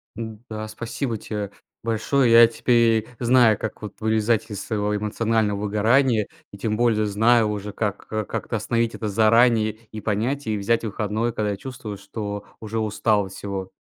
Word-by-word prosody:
Да. 110 0 -7
Спасибо 115 +2 -4
те 105 -1 -5 0.3
большое. 115 +3 +1
Я 115 0 +9
теперь 115 -1 +2
знаю, 120 -3 +5
как 110 - -5
вот 105 -3 -7
вылезать 110 0 +1
из 100 -1 -5
своего 105 -2 -1
эмоционального 105 0 0
выгорания 110 +2 +2 0.2
и 100 - -10
тем 105 +1 -1
более 115 -2 +2
знаю 110 +2 +3
уже, 105 0 -4
как 105 -1 -3
к 110 -1 -2
как-то 115 - -3
остановить 115 +2 0
это 110 - -4
заранее 110 +1 +4 0.2
и 110 - -7
понять, 115 +7 -1
и 110 -1 0
взять 115 +4 +1
выходной, 110 +2 -2
когда 105 -1 -1
я 100 - -4
чувствую, 125 -3 -7
что 100 0 -6
уже 110 0 -4
устал 105 -1 +1
от 95 - -10
всего. 95 -1 -5
110 Hz, 165 wpm, -23 LUFS, 105-115 Hz, 0.3 s, Я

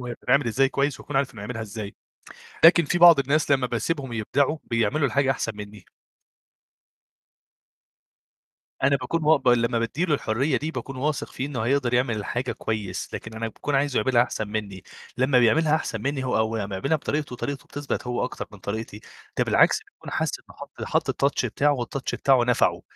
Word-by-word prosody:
وهي 120 -1 -5
بتتعمل 140 +2 +1
إزاي 135 +4 +2
كويس 140 -1 -1
وأكون 145 - -5
عارف 135 -2 0
إنه 105 - -9
هيعملها 115 +2 -5
إزاي، 105 -1 -7 0.7
لكن 170 -1 +7
في 175 - 0
بعض 170 -3 +8
الناس 145 +2 +1
لمّا 135 -2 +3
باسيبهم 135 +2 -2
يبدعوا 135 +7 0
بيعملوا 125 +6 +1
الحاجة 135 +2 +2
أحسن 115 -3 -2
منّي. 105 -1 -10 3.0
أنا 140 +1 +4
باكون 140 +5 -2
مو 155 0 +5
ب 135 - -5
لمّا 120 -1 +3
بادّي 125 +10 -1
له 160 - +1
الحرية 135 +2 0
دي 155 +2 -4
باكون 135 -4 -6
واثق 145 +2 -2
فيه 130 - -4
إنه 140 -5 -4
هيقدر 130 -1 +1
يعمل 120 -5 0
حاجة 125 +1 -2
كويس، 105 -4 -4
لكن 110 - -6
أنا 115 +1 -3
باكون 140 +5 -3
عايزه 140 -1 +1
يعملها 120 +2 +3
أحسن 110 -3 -4
منّي، 105 -3 -5 0.3
لمّا 130 0 +3
بيعملها 150 +6 +4
أحسن 160 - -3
منّي 140 0 -2
هو 130 - 0
أو 110 0 0
لمّا 100 -2 -4
يعملها 140 +11 0
بطريقته 150 -2 -3
وطريقته 140 +2 -5
بتثبت 145 -3 -4
هو 125 0 -1
أكتر 125 - -6
من 105 - -13
طريقتي، 105 +1 -5 0.4
ده - - +3
بالعكس - - +4
بيكون - - -13
حاس - - 0
إنه - - -19
حَط - - -10
حَط - - 0
الtouch 140 -2 +1
بتاعه 145 +5 +1
والtouch 130 +2 -4
بتاعه 130 -3 +3
نَفعه، 125 0 +2
130 Hz, 185 wpm, -25 LUFS, 115-140 Hz, 3.0 s, بعض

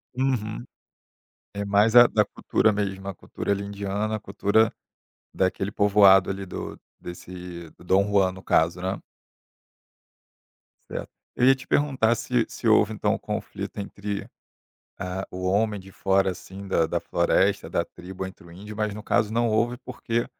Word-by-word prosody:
Uhum. 120 - -1 0.9
É 100 0 -3
mais 105 +3 +3
a 120 0 +11
da 105 -2 +2
cultura 110 +1 +1
mesmo, 100 -2 -3
a 100 - -4
cultura 100 - -4
ali, 100 0 -2
indiana, 100 +2 -2
a - - -7
cultura 105 +2 +2 0.6
daquele 95 +2 0
povoado 100 -3 +5
ali 95 0 -4
do 90 - -7 0.2
desse 90 -1 -9
do - - -19
Dom 95 +2 +3
Juan, 100 -2 +3
no 95 0 -11
caso, 85 +2 +2
né. 95 +2 -2 1.9
Certo. - - -5 0.3
Eu 125 - +3
ia 135 - +8
te 130 - -13
perguntar 130 -6 +2
se - - 0
se - - -4
houve, - - +4
então, - - 0
o - - -3
conflito - - -5
entre, 100 0 -5 0.7
ah, 90 +1 -4
o 90 0 -4
homem 105 +2 +1
de 95 0 -13
fora 95 +1 +2
assim 95 +2 -9
da 85 -4 +2
da - - -1
floresta, 85 0 +1
da - - 0
tribo, 95 +1 -8
entre 95 -2 -12
o - - -14
índio, 100 +5 -10
mas 105 -1 -2
no 105 - -7
caso 105 0 +1
não 120 +1 +1
houve, 115 +3 +1
porque 120 -2 -2
100 Hz, 165 wpm, -25 LUFS, 95-110 Hz, 1.9 s, a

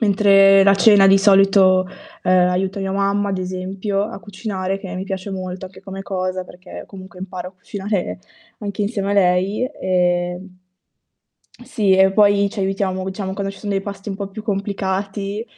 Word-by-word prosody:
Mentre 195 -2 +5
la 200 0 +6
cena, 200 -1 +6
di 195 0 +6
solito, 195 -2 +4 0.4
ehm, 180 0 +4
aiuto 190 +2 -1
mia 195 0 -3
mamma, 200 +1 0
ad 195 -1 -2
esempio, 185 +2 -3
a 220 +1 -5
cucinare 195 -1 -4
che 190 - -8
mi 185 - -4
piace 190 0 -5
molto 185 -1 -6
anche 185 0 -15
come 195 0 -8
cosa 185 -1 -3
perché 180 0 -11
comunque 190 -1 -12
imparo 180 -1 -6
a - - -30
cucinare 195 +1 -4 0.4
anche 205 -1 -4
insieme 200 -1 -2
a - - 0
lei. 190 +2 +2 0.2
E 180 -1 0 1.2
sì, 230 -6 0
e 190 0 +5
poi 200 0 +4
ci 215 - -10
aiutiamo 190 -1 -1
diciamo, 190 0 -4
quando 195 0 -3
ci 195 - -14
sono 205 -2 -4
dei 195 0 -1
pasti 200 0 -7
un 195 - -4
po' 200 -1 -5
più 215 +2 -9
complicati, 200 0 -3
195 Hz, 175 wpm, -20 LUFS, 185-200 Hz, 1.2 s, la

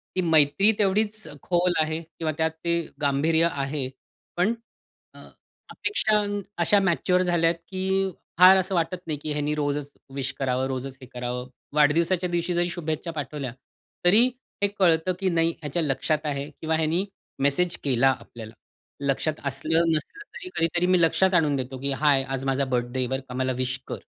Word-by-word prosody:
ती 185 - +2
मैत्री 160 +4 +4
तेवढीच 210 +1 +1 0.2
खोल 175 0 +2
आहे 155 +1 -1
किंवा 160 -1 -4
त्यात 160 0 +1
ते 170 0 +2 0.2
गांभीर्य 155 +4 +3
आहे. 140 -2 -2 0.5
पण 185 +6 +3 0.6
अ, - - -14 0.5
अपेक्षा 215 - +1 0.5
अशा 205 +4 +4
मॅच्युअर 180 -1 +2
झाल्या 170 -2 +3
की 190 +3 -2 0.3
फार 185 +2 +9
असं 190 0 0
वाटत 170 +2 0
नाही 155 -2 -2
की 155 - -3
ह्यानी 150 0 -1
रोजच 145 -1 -2 0.2
विश 135 0 -2
करावं, 130 -1 0
रोजच 135 0 -5
हे 130 - -9
करावं. 125 0 -4 0.3
वाढदिवसाच्या 170 +5 +3
दिवशी 175 +1 -1
जरी 175 0 +1
शुभेच्छा 165 -1 -3
पाठवल्या 145 -4 -5 0.5
तरी 210 +7 +7 0.4
हे 200 - +5
कळतं 170 0 +3
की 190 -1 +1
नाही, 165 -1 +2
ह्याच्या 150 +3 -2
लक्षात 150 +2 0
आहे. 140 -1 -3
किंवा 160 0 +1
ह्यानी 160 +5 +1 0.3
मेसेज 140 +6 +1
केला 135 -1 +3
आपल्याला. 110 -2 -11 0.5
लक्षात 140 +3 0
असलं-नसलं 160 - 0
तरी 365 - -7
कधीतरी 170 +2 +1
मी 185 -1 +4
लक्षात 185 +3 +3
आणून 155 -5 +3
देतो 130 0 -4
की 140 0 -1
"हाय, 135 0 +3
आज 135 0 -4
माझा 135 +1 +1
बर्थडे 125 0 -2
आहे, 125 - 0
बरं 130 +2 -2
का, - - -6
मला 130 0 0
विश 130 0 -2
कर." - - -4
160 Hz, 165 wpm, -25 LUFS, 140-175 Hz, 0.6 s, फार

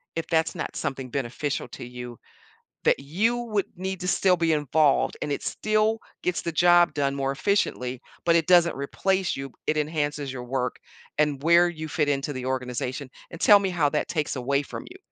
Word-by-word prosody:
if 165 - -3
that's 160 -1 +1
not 165 - -4
something 135 -1 -4
beneficial 140 +2 -2
to - - -8
you, 125 -1 -8 0.6
that - - +3
you 200 +13 0
would 215 -5 -1
need 190 0 -4
to 180 - -3
still 185 -1 +3
be 165 0 +2
involved 150 0 +2
and 145 - -2
it 140 - -2
still 215 +1 +1 0.2
gets 180 -1 0
the 170 - -3
job 175 +1 +5
done 140 -1 0
more 135 -1 -1
efficiently, 130 -7 -1 0.2
but 170 - +4
it 165 -2 +3
doesn't 175 -2 +5
replace 185 +7 0
you, 135 - -4
b - - -25
it 155 - +1
enhances 145 -2 -1
your 125 -2 -6
work 125 0 -2 0.4
and 150 -3 +1
where 170 +2 +5
you 160 -2 -6
fit 150 -1 0
into 140 +1 -1
the 130 -1 -5
organization, 130 +1 -3 0.2
and 170 - -8
tell 205 -2 +8
me 195 -1 -1
how 170 -5 +2
that 150 - -1
takes 155 -4 -1
away 140 +2 0
from - - -8
you." 365 - -12
150 Hz, 200 wpm, -26 LUFS, 135-175 Hz, 0.6 s, tell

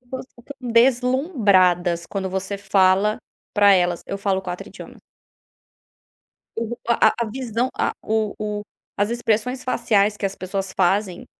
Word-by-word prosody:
pessoas 255 +1 -7
ficam 255 +4 -12 0.2
deslumbradas 230 - +3
quando 190 -2 -3
você 190 +2 -3
fala 195 +1 +2 0.3
pra 205 -1 +6
elas: 175 -2 +1
"Eu 200 - -3
falo 195 -1 0
4 180 -1 -6
idiomas". - - -12 1.5
O 230 +1 -3
a 235 - +4
a - - -4
a 220 - -7
visão 250 -1 -2
a - - +1
o 215 -1 0
o 210 -1 -3 0.4
as 205 +2 +1
expressões 240 +2 -1
faciais 210 -5 +1
que - - -3
as 195 0 -3
pessoas 190 +1 -4
fazem, 190 0 +1
205 Hz, 140 wpm, -22 LUFS, 190-235 Hz, 1.5 s, pra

